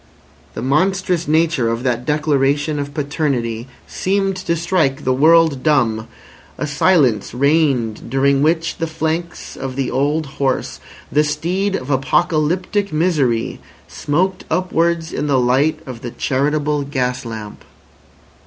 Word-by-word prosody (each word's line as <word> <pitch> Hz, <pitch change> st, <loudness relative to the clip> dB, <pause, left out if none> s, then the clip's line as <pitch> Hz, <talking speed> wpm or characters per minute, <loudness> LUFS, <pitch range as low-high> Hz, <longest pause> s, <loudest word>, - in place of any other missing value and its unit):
The 115 Hz, -, -4 dB
monstrous 180 Hz, +4 st, +1 dB
nature 155 Hz, -5 st, +2 dB
of 115 Hz, +1 st, -2 dB
that 125 Hz, -1 st, -1 dB
declaration 150 Hz, 0 st, +1 dB
of 140 Hz, 0 st, -4 dB
paternity 135 Hz, -6 st, -2 dB, 0.2 s
seemed 195 Hz, 0 st, -1 dB
to 175 Hz, -2 st, -1 dB
strike 165 Hz, -5 st, 0 dB
the 130 Hz, -, +2 dB
world 160 Hz, 0 st, +4 dB
dumb. 120 Hz, -8 st, +1 dB, 0.5 s
A -, -, -2 dB
silence 140 Hz, -, +2 dB
reigned 135 Hz, -6 st, +1 dB
during 135 Hz, +2 st, +2 dB
which 165 Hz, +2 st, +1 dB
the 165 Hz, -, -1 dB
flanks 160 Hz, +2 st, -3 dB
of 135 Hz, -1 st, -5 dB
the 135 Hz, -2 st, -2 dB
old 145 Hz, +4 st, 0 dB, 0.2 s
horse, 135 Hz, -2 st, -1 dB, 0.3 s
the 150 Hz, -, +3 dB
steed 175 Hz, +7 st, -1 dB
of 130 Hz, -2 st, -4 dB
apocalyptic 175 Hz, +8 st, +1 dB
misery, 150 Hz, -8 st, 0 dB, 0.3 s
smoked 185 Hz, +6 st, -1 dB
upwards 170 Hz, -1 st, 0 dB
in 150 Hz, -, -2 dB
the 140 Hz, -2 st, +2 dB
light 135 Hz, +6 st, +2 dB
of 125 Hz, -3 st, -8 dB
the 120 Hz, -, -5 dB
charitable 145 Hz, +4 st, 0 dB
gas 130 Hz, -3 st, -2 dB
lamp. 110 Hz, -3 st, -8 dB
150 Hz, 130 wpm, -18 LUFS, 130-165 Hz, 0.5 s, world